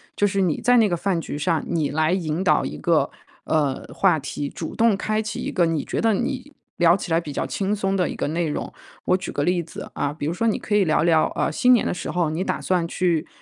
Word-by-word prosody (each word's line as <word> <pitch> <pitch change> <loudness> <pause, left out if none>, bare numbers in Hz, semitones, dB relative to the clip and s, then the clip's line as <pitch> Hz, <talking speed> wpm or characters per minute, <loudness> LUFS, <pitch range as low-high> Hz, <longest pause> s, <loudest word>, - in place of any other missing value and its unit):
就 205 - +2
是 195 0 0
你 175 -5 +1
在 245 +1 +4
那 225 -3 +5
个 175 - +1
饭 185 0 0
局 145 - -5
上 160 +2 0
你 160 -4 0
来 155 +2 +1
引 170 -1 -1
导 190 - +3
一 - - -5
个， - - +2 0.4
呃， 145 -4 0
话 185 -4 +3
题， 140 0 -4
主 160 - -6
动 225 -3 +3
开 215 +2 -1
启 215 - -5
一 - - -3
个 175 - +2
你 160 -3 -1
觉 - - -2
得 225 -1 +3
你 260 +5 -3 0.3
聊 170 +1 +5
起 175 - -6
来 165 - +4
比 150 - -7
较 - - -2
轻 200 +1 -1
松 195 -1 -1
的 180 -3 +1
一 - - -5
个 - - -2
内 165 +1 -1
容。 150 - -4 0.3
我 185 - +3
举 185 - -6
个 145 - -1
例 175 +2 +1
子， 165 - -9
啊， 140 - -1
比 150 -1 -5
如 160 - -1
说 230 +6 0
你 220 - +1
可 210 - -2
以 205 - +5
聊 155 -1 +2
聊， 165 -2 +3
呃， - - 0
新 250 +11 +3
年 240 - +3
的 - - 0
时 180 - -5
候， 175 -3 0
你 165 +4 -2
打 - - -2
算 180 -3 0
去， 170 -3 0
175 Hz, 285 characters per minute, -23 LUFS, 160-200 Hz, 0.4 s, 那